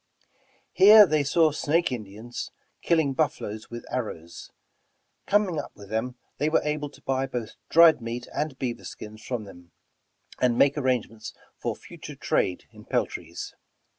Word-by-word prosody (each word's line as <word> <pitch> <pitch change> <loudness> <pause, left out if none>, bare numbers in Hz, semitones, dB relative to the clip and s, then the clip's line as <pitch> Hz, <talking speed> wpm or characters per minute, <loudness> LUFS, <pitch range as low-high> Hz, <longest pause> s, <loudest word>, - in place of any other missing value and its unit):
Here 210 +3 +9
they 155 -4 +1
saw 155 +2 +3
Snake 155 +2 +1
Indians 110 0 -6 0.3
killing 160 -5 +2
buffaloes 110 -7 -2
with 120 0 -8
arrows. 105 -9 -5 0.8
Coming 200 -6 +2
up 145 - -7
with 100 0 -13
them, 120 +3 -2 0.2
they 150 +2 +2
were 155 - +2
able 150 -1 -2
to - - -19
buy 135 0 0
both 120 -4 -5 0.2
dried 165 -4 +7
meat 120 +1 -5
and 150 -3 -2
beaver 120 -3 -4
skins 110 0 -9
from 125 -4 -3
them, 90 -4 -14 0.7
and 125 -2 +2
make 140 +2 +4
arrangements 125 -6 -2 0.2
for - - -3
future - - -11
trade 90 - -1
in - - -14
peltries. - - -3
130 Hz, 145 wpm, -26 LUFS, 110-150 Hz, 0.8 s, Here